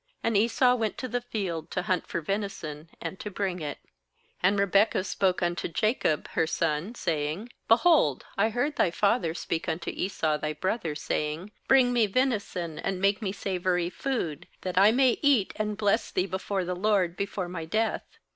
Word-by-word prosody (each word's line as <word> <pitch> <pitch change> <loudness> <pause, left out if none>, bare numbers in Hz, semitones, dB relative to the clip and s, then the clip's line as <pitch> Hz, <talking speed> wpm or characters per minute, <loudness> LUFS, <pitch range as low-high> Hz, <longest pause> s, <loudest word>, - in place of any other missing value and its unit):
And 230 -1 +1
Esau 235 +4 +4
went 225 -3 -1
to 255 - -4
the 245 +1 -2
field 185 -9 -4
to - - -2
hunt 180 0 0
for 170 - -3
venison, 165 -5 -4
and 190 - -6
to 210 - -5
bring 190 -2 -2
it. 145 -2 -4 0.7
6And 195 +3 +4
Rebekah 200 0 +3
spoke 190 -2 0
unto 175 0 -1
Jacob 195 - 0
her 160 - +1
son, 165 +7 -1
saying: 160 +5 -2 0.2
'Behold, 235 - +4
I 210 +3 +2
heard 245 +6 -1
thy - - +4
father 185 -2 +1
speak 165 0 -3
unto 160 +1 -2
Esau 160 -5 -1
thy 155 0 -2
brother, 170 0 -2
saying: 155 +5 -3 0.2
7Bring 260 -2 +6
me 235 -3 +3
venison, 200 - -1
and 190 -1 -2
make 200 +2 +2
me 195 -3 -1
savoury 180 -3 -1
food, 205 - -3
that 185 -1 -4
I 200 +3 +7
may 255 +1 +3
eat, 275 -9 +3
and 210 -1 -2
bless 215 +1 +1
thee 185 - 0
before 190 0 -2
the 180 +1 -2
LORD 185 -3 +1
before 195 -2 -3
my 170 -2 -5
death. 220 +6 -2
195 Hz, 175 wpm, -28 LUFS, 170-220 Hz, 0.7 s, I